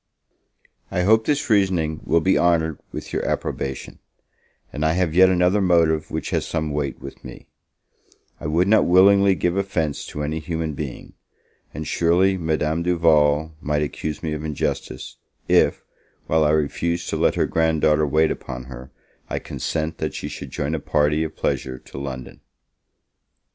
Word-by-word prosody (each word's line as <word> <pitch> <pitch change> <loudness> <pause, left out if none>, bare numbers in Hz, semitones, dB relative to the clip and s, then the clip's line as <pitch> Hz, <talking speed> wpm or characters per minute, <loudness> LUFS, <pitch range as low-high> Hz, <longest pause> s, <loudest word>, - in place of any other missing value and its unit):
I 90 -2 0
hope 110 +3 +3
this 145 -1 +1
reasoning 95 -8 +1
will 85 +1 +2
be 95 +3 +3
honoured 80 -3 +2
with - - -7
your - - -1
approbation; 65 0 -4 0.7
and 75 - -3
I 80 +1 +2
have 90 -2 0
yet 95 +2 +6
another 90 +2 +2
motive 80 -4 +2
which - - -4
has - - 0
some 80 -2 -2
weight 70 -2 -3
with 70 - -10
me: - - -11 0.9
I - - -5
would 85 +5 +2
not 110 +2 +4
willingly 100 +2 +5
give 90 0 0
offence 95 -7 -1
to 75 - -5
any 80 +2 -2
human 80 0 -3
being; 70 -2 -7 0.6
and 75 +1 -6
surely 90 +3 +2
Madame 80 -1 -1
Duval 80 -3 +2
might 75 +1 0
accuse 75 +1 -5
me 80 -1 -2
of 75 0 -5
injustice, 75 -2 -4 0.3
if, - - +3 0.4
while 80 0 +2
I - - +3
refuse 85 +3 0
to - - -1
let - - +2
her - - +2
grand 80 -1 +1
daughter 75 0 +3
wait 80 +2 +2
upon 65 -1 -6
her, 65 0 -10 0.4
I - - -2
consent 80 0 -3
that - - -3
she - - -4
should 70 - -8
join 70 +4 -3
a 80 - -1
party 75 +2 +1
of 80 0 -5
pleasure 65 -1 -2
to 65 - -10
London. 65 -3 -7
80 Hz, 165 wpm, -22 LUFS, 75-90 Hz, 0.9 s, yet